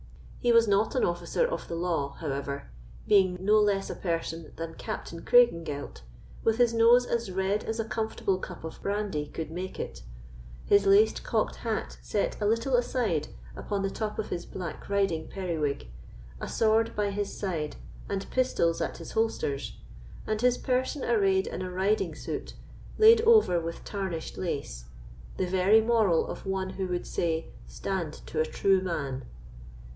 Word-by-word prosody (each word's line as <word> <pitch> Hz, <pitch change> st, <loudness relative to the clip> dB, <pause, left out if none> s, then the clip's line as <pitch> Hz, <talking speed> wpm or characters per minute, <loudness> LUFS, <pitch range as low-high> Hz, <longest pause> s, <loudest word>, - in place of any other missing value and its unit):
He 240 Hz, -, +2 dB
was 230 Hz, -1 st, +6 dB
not 205 Hz, +5 st, +2 dB
an 255 Hz, -, +2 dB
officer 175 Hz, -, 0 dB
of -, -, -3 dB
the 170 Hz, -, -4 dB
law, 165 Hz, -5 st, -1 dB
however; 140 Hz, -, -4 dB, 0.4 s
being 190 Hz, -3 st, +4 dB
no 210 Hz, +3 st, +4 dB
less 200 Hz, -2 st, +2 dB
a -, -, -3 dB
person 165 Hz, -2 st, -3 dB
than 165 Hz, 0 st, -5 dB
Captain 165 Hz, +1 st, -6 dB
Craigengelt, 170 Hz, -, +2 dB, 0.4 s
with 225 Hz, 0 st, +2 dB
his 240 Hz, -1 st, +4 dB
nose 235 Hz, +2 st, +6 dB
as 235 Hz, -4 st, -1 dB
red 190 Hz, +3 st, 0 dB
as 225 Hz, +1 st, -3 dB
a 225 Hz, -, 0 dB
comfortable 220 Hz, -4 st, -1 dB
cup 180 Hz, -3 st, -8 dB
of 160 Hz, -, -8 dB
brandy 200 Hz, -7 st, -2 dB
could 160 Hz, +1 st, -6 dB
make 185 Hz, +3 st, -5 dB
it, -, -, -5 dB, 0.6 s
his 200 Hz, -1 st, +4 dB
laced 205 Hz, +3 st, +5 dB
cocked 220 Hz, -2 st, 0 dB
hat 225 Hz, -2 st, -3 dB
set 205 Hz, +1 st, -2 dB
a 205 Hz, -, +2 dB
little 230 Hz, +5 st, +1 dB
aside 235 Hz, -, 0 dB, 0.3 s
upon 200 Hz, -, -3 dB
the 195 Hz, -, -1 dB
top 215 Hz, -1 st, -3 dB
of -, -, -3 dB
his 170 Hz, -, -3 dB
black 175 Hz, -2 st, -7 dB
riding 195 Hz, -6 st, +1 dB
periwig, 155 Hz, -, -3 dB, 0.5 s
a -, -, -5 dB
sword 225 Hz, +1 st, +2 dB
by 205 Hz, -1 st, 0 dB
his 205 Hz, 0 st, -3 dB
side 165 Hz, -7 st, -3 dB, 0.3 s
and 195 Hz, -1 st, -2 dB
pistols 170 Hz, -10 st, +1 dB
at -, -, -2 dB
his -, -, -9 dB
holsters, 220 Hz, -11 st, -1 dB, 0.5 s
and 215 Hz, 0 st, -1 dB
his 250 Hz, 0 st, +3 dB
person 260 Hz, +2 st, -1 dB
arrayed 195 Hz, -5 st, +3 dB
in -, -, -5 dB
a 185 Hz, -, -3 dB
riding 190 Hz, +4 st, 0 dB
suit, -, -, -5 dB, 0.4 s
laid 450 Hz, +1 st, +8 dB
over 435 Hz, -, +5 dB
with 165 Hz, 0 st, -6 dB
tarnished 190 Hz, -5 st, -4 dB
lace—the -, -, -6 dB
very 190 Hz, +4 st, +4 dB
moral 220 Hz, -7 st, +3 dB
of -, -, -7 dB
one 190 Hz, -1 st, -1 dB
who 190 Hz, -1 st, -3 dB
would 180 Hz, -1 st, -2 dB
say, 165 Hz, -1 st, -2 dB, 0.2 s
"Stand 165 Hz, -, -3 dB
to -, -, -4 dB
a 155 Hz, -, +3 dB
true 190 Hz, +3 st, +2 dB
man." 140 Hz, -8 st, -3 dB
195 Hz, 165 wpm, -28 LUFS, 165-220 Hz, 0.6 s, laid